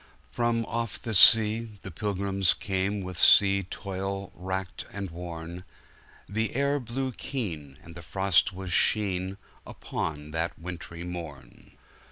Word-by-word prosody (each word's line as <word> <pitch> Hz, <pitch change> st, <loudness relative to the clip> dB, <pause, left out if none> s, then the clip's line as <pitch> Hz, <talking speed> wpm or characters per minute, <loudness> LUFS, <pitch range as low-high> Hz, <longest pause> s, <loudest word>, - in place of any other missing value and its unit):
*From 120 Hz, -1 st, -1 dB
off 115 Hz, 0 st, -4 dB
the 110 Hz, -, -6 dB
sea, 110 Hz, +2 st, +8 dB
the 95 Hz, -, -8 dB
pilgrims 100 Hz, -1 st, -1 dB
came, 100 Hz, +1 st, -2 dB
With 90 Hz, -2 st, -7 dB
sea 100 Hz, +4 st, +6 dB
toil 95 Hz, +1 st, -6 dB
wracked 95 Hz, 0 st, -6 dB
and 100 Hz, -3 st, -6 dB
worn; 85 Hz, 0 st, -8 dB, 0.6 s
The 110 Hz, +5 st, -3 dB
air 140 Hz, +2 st, +1 dB
blew 130 Hz, +2 st, -4 dB
keen, 85 Hz, -, -6 dB
and 85 Hz, -, -13 dB
the 85 Hz, -, -10 dB
frost 95 Hz, 0 st, +1 dB
was 95 Hz, -1 st, -6 dB
sheen, 95 Hz, -2 st, +1 dB, 0.3 s
Upon 75 Hz, -1 st, -6 dB
that 85 Hz, +2 st, -3 dB
wintry 85 Hz, 0 st, -8 dB
morn. 80 Hz, -8 st, -10 dB
95 Hz, 130 wpm, -27 LUFS, 85-105 Hz, 0.6 s, sea